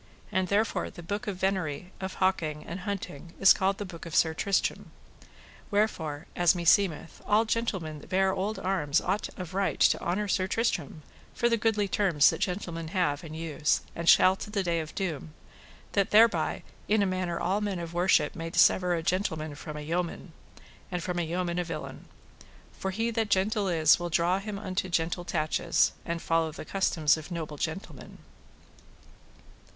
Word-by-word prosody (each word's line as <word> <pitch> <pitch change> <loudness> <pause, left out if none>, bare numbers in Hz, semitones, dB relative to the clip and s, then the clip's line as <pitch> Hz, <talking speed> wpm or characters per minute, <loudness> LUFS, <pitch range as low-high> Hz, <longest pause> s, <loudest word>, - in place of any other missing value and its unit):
And 185 0 +1
therefore 205 +3 0
the 175 - -11
book 205 +5 -4
of 200 -3 -3
venery, 185 -3 -2
of 190 0 -4
hawking, 160 -5 0
and 170 +3 -6
hunting, 180 -5 -6
is 195 - +8
called 195 +1 0
the 205 - -4
book 170 -2 -9
of 165 - -6
Sir 160 -1 +4
Tristram. 195 +4 -1 0.8
Wherefore, 165 -8 -1
as 175 0 +4
meseemeth, 170 -1 +2
all 215 +2 +4
gentlemen 190 -10 -2
that - - -15
bear 190 0 +2
old 195 +3 -2
arms 165 -6 +1
ought 195 +4 -2
of 180 -2 -7
right 195 0 0
to - - +4
honour 200 +4 -1
Sir 185 -1 +1
Tristram 170 - -1 0.3
for 235 - +2
the 230 - +3
goodly 215 -2 +1
terms 185 -7 +4
that - - -5
gentlemen 170 -3 -3
have 165 -5 0
and 155 -1 -8
use, 160 -2 0
and 170 0 +1
shall 185 +1 +7
to - - -7
the 205 -2 -1
day 170 -2 0
of 155 -1 -7
doom, 160 -5 -4 0.6
that 200 -2 +1
thereby 225 +2 +4 0.2
in 210 -1 +3
a - - +2
manner 185 -2 -2
all 190 +4 0
men 205 -3 -2
of 170 -1 -6
worship 175 -4 +3
may 165 0 -5
dissever 180 +1 +4
a 165 - -3
gentleman 160 -4 -1
from 150 +1 -8
a - - -5
yeoman, 170 +2 -3 0.6
and 180 -2 -3
from 180 -1 -2
a - - +1
yeoman 175 +1 -2
a - - +1
villain. 175 - -7 0.7
For 190 - -4
he 225 +5 -1
that 225 -2 -1
gentle 200 +1 +1
is 160 -3 +4
will 175 0 -3
draw 170 +3 +2
him 205 0 -5
unto 185 -1 -3
gentle 170 +1 -1
tatches, 165 0 +1
and 170 0 -3
to - - -13
follow 165 -1 +1
the 155 - -9
customs 165 -6 +2
of 155 +1 -9
noble 160 -4 -5
gentlemen. 160 +8 -6
180 Hz, 180 wpm, -28 LUFS, 165-195 Hz, 0.8 s, is